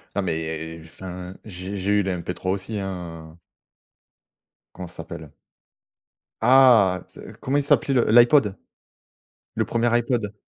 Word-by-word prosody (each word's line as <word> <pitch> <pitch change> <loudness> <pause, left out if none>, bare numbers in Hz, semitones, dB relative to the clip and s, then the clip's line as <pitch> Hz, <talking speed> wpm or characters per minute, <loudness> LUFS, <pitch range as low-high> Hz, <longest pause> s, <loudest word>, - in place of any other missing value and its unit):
Non, - - 0
mais 80 0 -4
enfin, 90 +2 -9
j'ai 95 0 -7
j'ai 95 +2 -1
eu 105 -1 +3
la 95 - -1
MP3 90 +1 -5
aussi, 100 +2 -2
hein. 85 -4 -7 1.4
Comment 90 -1 -7
ça - - -12
s'appelle? - - -9 1.1
Ah, 120 -9 +5
ts - - -12
comment 135 +2 0
il 145 - +1
s'appelait 140 -1 +2
le 120 -3 +2
l'iPod. 120 -3 +5 1.0
Le - - +1
1er 120 0 0
iPod. 115 -3 -1
95 Hz, 130 wpm, -23 LUFS, 90-115 Hz, 1.4 s, Ah